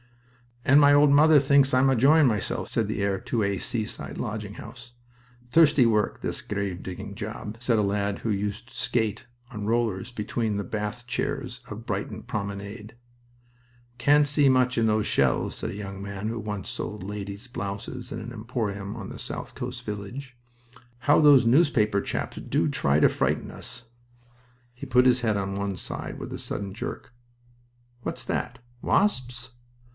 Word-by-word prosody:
"And 140 +2 +7
my 145 -1 +7
old 145 0 +6
mother 150 +1 +7
thinks 140 0 +4
I'm 130 +1 +5
enjoying 140 +5 +5
myself!" 105 -5 -1
said 110 -3 0
the 105 -1 -2
heir 100 -1 0
to 115 -3 -1
a 100 -1 0
seaside 110 -3 -4
lodging 105 -1 -4
house. 120 +2 -11 0.6
"Thirsty 150 -5 +6
work, 105 -2 +1
this - - -3
grave 100 -3 -3
digging 90 -1 -7
job," 105 +2 -6
said 120 -1 +1
a 105 - +3
lad 100 0 -1
who 115 - -2
used 105 +4 -3
to - - -17
skate 115 -3 -1 0.2
on 105 -1 -5
rollers 115 -2 0
between 110 -1 -2
the 100 - -2
bath 105 +4 -4
chairs 125 0 -3
of 110 +2 -8
Brighton 100 -2 -4
promenade. 100 +2 -5 1.0
"Can't 145 +4 +5
see 145 -1 +4
much 125 -1 +3
in 115 - +3
those 110 -1 +2
shells," - - +1
said - - -4
a - - -7
young 100 -1 -6
man 100 +1 -5
who 115 0 -3
once 105 -3 -5
sold 105 -2 -5
ladies' 100 +3 -6
blouses 105 +2 -6
in - - -4
an 115 +2 -7
emporium 110 -3 -4
of 110 -4 -7
a - - -9
south - - -6
coast - - -6
village. 120 +6 -6 0.6
"How 145 +4 +4
those 145 -5 +7
newspaper 115 -7 +3
chaps - - -4
do - - 0
try 70 +2 +2
to - - +6
frighten - - -1
us!" 120 +1 -10 0.9
He 125 +3 -8
put 125 0 +4
his 125 -1 +4
head 110 -3 +1
on 100 0 -2
one 100 -1 -2
side - - -6
with - - -6
a - - -5
sudden 100 -2 -4
jerk. 115 - -6 0.9
"What's - - -4
that? - - -3 0.2
Wasps?" 130 - 0
110 Hz, 170 wpm, -26 LUFS, 100-125 Hz, 1.0 s, And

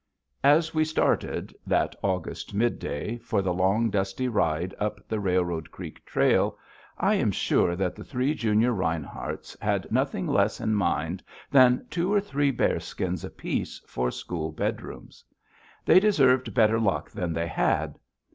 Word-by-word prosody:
As 155 +4 +4
we 155 -1 +3
started, 155 0 0
that - - +1
August 95 +1 -3
midday, 115 -1 -1
for 100 -3 -1
the 90 -2 0
long, 100 +5 +2
dusty 100 +5 -1
ride 90 -5 0
up 105 0 -3
the 110 - -2
Railroad 90 -4 0
Creek - - -10
Trail, - - +2 0.4
I - - +2
am - - +2
sure 85 - +1
that 90 -1 -1
the - - -9
three 130 +2 -1
junior 115 -3 +2
Rineharts 85 -6 -4
had - - -1
nothing - - 0
less - - +1
in 110 - 0
mind 90 -3 0 0.3
than 130 -2 +5
two 175 +3 0
or 205 - +4
three 145 -8 0
bearskins 135 - -1
apiece - - -4
for 60 0 -2
school 80 +3 -4
bedrooms. 75 - -5 0.6
They - - +7
deserved 135 -11 +3
better 115 -1 +4
luck 105 -4 0
than 90 -6 -3
they 85 +1 -1
had. 80 - 0
105 Hz, 145 wpm, -26 LUFS, 90-130 Hz, 0.6 s, They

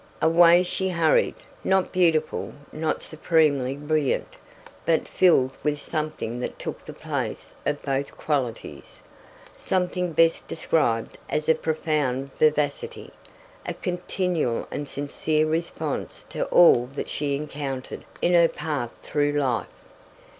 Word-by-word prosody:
Away 170 +2 +6
she 190 +1 -1
hurried, 170 -3 +2 0.3
not 190 -1 +2
beautiful, 165 -4 +1 0.2
not 155 0 -2
supremely 150 -5 +1
brilliant, 150 -1 -1 0.5
but 165 -1 +1
filled 135 -8 +4
with 150 -1 0
something 150 -7 -3
that 125 - -4
took - - -6
the - - -8
place - - -4
of 145 - -1
both 140 0 -2
qualities 125 - -3 0.5
something 180 -1 -1
best 165 +1 +3
described 120 -9 0
as 150 0 -1
a 160 - +6
profound 150 -5 -1
vivacity, 150 -2 0 0.5
a - - -4
continual 180 -7 -1
and 145 - -4
sincere 150 +2 0
response 165 +2 -3
to - - -2
all 145 - +6
that - - -3
she 145 -1 -1
encountered 140 -3 -5 0.2
in 175 - +3
her 170 -1 +6
path 145 -6 -4
through 145 -1 0
life. 130 -8 -1
155 Hz, 120 wpm, -25 LUFS, 140-165 Hz, 0.5 s, Away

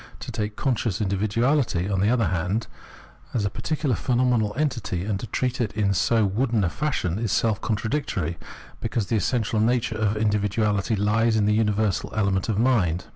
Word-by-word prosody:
To - - -6
take 105 0 -3
conscious 115 -7 -1
individuahty, 110 - +1
on 95 - +1
the 100 +3 +3
other 120 -3 +2
hand, 95 +6 -1 0.7
as 110 -4 +1
a 100 - -1
particular 150 -1 -1
phenomenal 120 +2 +1
entity, 120 - -1
and 100 -1 -2
treat 125 0 -1
it 110 -3 -1
in 105 -2 +1
so 110 +3 +2
wooden 115 +2 +1
a 85 - 0
fashion, 120 - -1
is 115 -4 -1
self 110 -1 +1
contradictory, 105 - -2 0.4
because 115 -2 -2
the 115 - -1
essential 110 +1 0
nature 120 +2 +1
of 105 -1 +1
individuality 105 0 +1
Ues 110 +3 +2
in 105 -2 +2
the 105 - +3
universal 105 -2 +1
element 100 -1 0
of 105 - 0
mind. 105 -8 +2
110 Hz, 170 wpm, -24 LUFS, 100-120 Hz, 0.7 s, the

